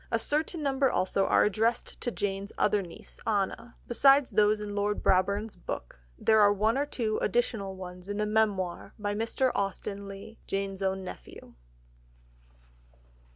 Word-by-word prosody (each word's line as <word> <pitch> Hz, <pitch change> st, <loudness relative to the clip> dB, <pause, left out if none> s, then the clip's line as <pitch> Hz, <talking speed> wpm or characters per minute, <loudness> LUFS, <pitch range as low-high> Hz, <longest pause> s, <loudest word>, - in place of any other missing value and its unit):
A 230 Hz, -, +2 dB
certain 305 Hz, +6 st, +1 dB
number 270 Hz, -1 st, +2 dB
also 195 Hz, -2 st, +1 dB
are -, -, +4 dB
addressed 220 Hz, +3 st, 0 dB
to -, -, 0 dB
Jane's 200 Hz, -2 st, -3 dB
other 210 Hz, 0 st, +2 dB
niece, 170 Hz, -3 st, -11 dB
Anna. 215 Hz, +3 st, -1 dB
Besides 275 Hz, +3 st, +5 dB
those 210 Hz, 0 st, +3 dB
in 210 Hz, -1 st, -5 dB
Lord 205 Hz, 0 st, -1 dB
Brabourne's 200 Hz, +3 st, +2 dB
book, 175 Hz, -, -7 dB, 0.2 s
there 220 Hz, -1 st, +4 dB
are 205 Hz, -1 st, +6 dB
one 215 Hz, +3 st, +2 dB
or 285 Hz, +2 st, 0 dB
two 220 Hz, -6 st, -1 dB
additional 210 Hz, -3 st, -1 dB
ones 180 Hz, 0 st, -9 dB
in 205 Hz, -, -3 dB
the 210 Hz, -, 0 dB
Memoir 210 Hz, -5 st, 0 dB
by 205 Hz, -1 st, -2 dB
Mr. 230 Hz, +4 st, 0 dB
Austen 200 Hz, 0 st, -3 dB
Leigh, 200 Hz, +3 st, -10 dB
Jane's 195 Hz, 0 st, -3 dB
own 190 Hz, 0 st, -1 dB
nephew. 185 Hz, -, -10 dB
210 Hz, 155 wpm, -29 LUFS, 195-225 Hz, 0.2 s, are